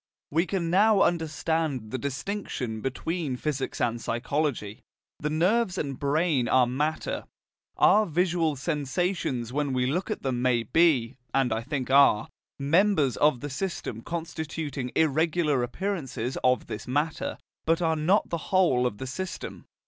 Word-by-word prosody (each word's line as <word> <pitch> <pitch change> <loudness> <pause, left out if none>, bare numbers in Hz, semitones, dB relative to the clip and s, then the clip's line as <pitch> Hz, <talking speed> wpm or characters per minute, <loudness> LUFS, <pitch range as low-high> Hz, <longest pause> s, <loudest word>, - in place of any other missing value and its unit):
We 165 +5 +2
can 170 -4 -1
now 205 +2 +5
understand 160 -7 -1
the 130 - -2
distinction 135 - -4
between 150 +2 -2
physics 140 -1 -3
and 120 -1 0
psychology. 120 -3 -2 0.4
The 150 - -2
nerves 185 +5 +1
and 140 -5 -3
brain 145 -3 +1
are 130 +1 +4
matter: 150 +6 -2 0.5
our 215 +2 +5
visual 170 -2 +1
sensations 145 - -2
when 145 -1 0
we 125 -1 +1
look 170 - -1
at 215 - -3
them 130 -3 -1
may 125 -2 +2
be, 135 -3 +2 0.2
and 135 -3 +2
I 110 - -1
think 130 0 -3
are, 140 -6 +5 0.3
members 155 - +3
of 145 -5 +3
the 145 - -4
system 135 - -4
constituting 160 -4 -4
irregular 155 -2 +2
appearances 135 - -3
of 125 0 +3
this 105 - -7
matter, 145 +5 -1 0.3
but 165 +1 +3
are 165 -2 +1
not 175 +7 +2
the 170 - 0
whole 160 -10 +3
of 105 - -5
the 130 - -5
system. 185 +8 -6
150 Hz, 145 wpm, -27 LUFS, 130-170 Hz, 0.5 s, now